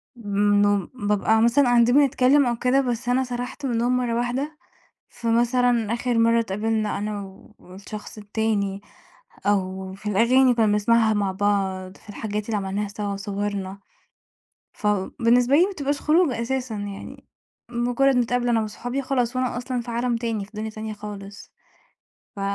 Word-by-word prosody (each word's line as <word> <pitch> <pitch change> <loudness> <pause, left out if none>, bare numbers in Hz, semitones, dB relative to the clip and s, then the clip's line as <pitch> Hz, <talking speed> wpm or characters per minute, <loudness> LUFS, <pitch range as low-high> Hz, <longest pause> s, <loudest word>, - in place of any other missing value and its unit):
من 205 -2 0
إنُّه 205 -2 +1
بابقى 220 -1 +1
مثلًا 235 +5 +4
قاعدين 245 0 +4
بنتكلّم 280 0 +4
أو 240 -1 0
كده 255 +3 +2
بس 245 -1 -2
أنا 260 +1 +2
سَرَحت 250 +2 -5
منهم 245 0 +1
مرّة 240 -2 -1
واحدة، 260 +6 -2 0.5
فمثلًا 235 -1 +1
آخِر 240 0 -1
مرّة 230 0 +4
اتقابلنا 215 0 -1
أنا 210 0 -3
و 190 0 -14
والشخص 200 +4 -10
التاني 205 -2 -2 0.7
أو 190 -1 -1
في 210 +2 -5
الأغاني 235 +6 +4
اللي 255 - +5
كنّا 225 -2 +3
بنسمَعها 220 +2 +3
مع 200 -2 0
بعض، 190 -1 -1
في - - -21
الحاجات 210 0 -4
اللي 220 -1 -1
عملناها 200 +1 -2
سوا 205 0 -4
وصُوَرنا، 200 -1 -4 0.9
فبالنسبة 230 +6 +2
لي 340 - +6
ما 390 - -1
بتبقاش 285 -4 -2
خروجة 305 -7 +2
أساسًا، 255 -1 -2
يعني 205 -1 -7 0.5
مجرّد 245 +3 +2
نتقابل 245 0 +1
أنا 230 -2 +2
وأصحابي 245 +5 -4
خلاص 255 -2 -1
وأنا 255 -1 -1
أصلًا 250 0 -3
في 235 - -8
عالم 235 +1 0
تاني، 225 -3 -2
في 200 - -18
دنيا 215 +1 -4
تانية 220 0 -6
خالص 205 -1 -9 0.8
ف - - -6
230 Hz, 155 wpm, -23 LUFS, 205-245 Hz, 0.9 s, لي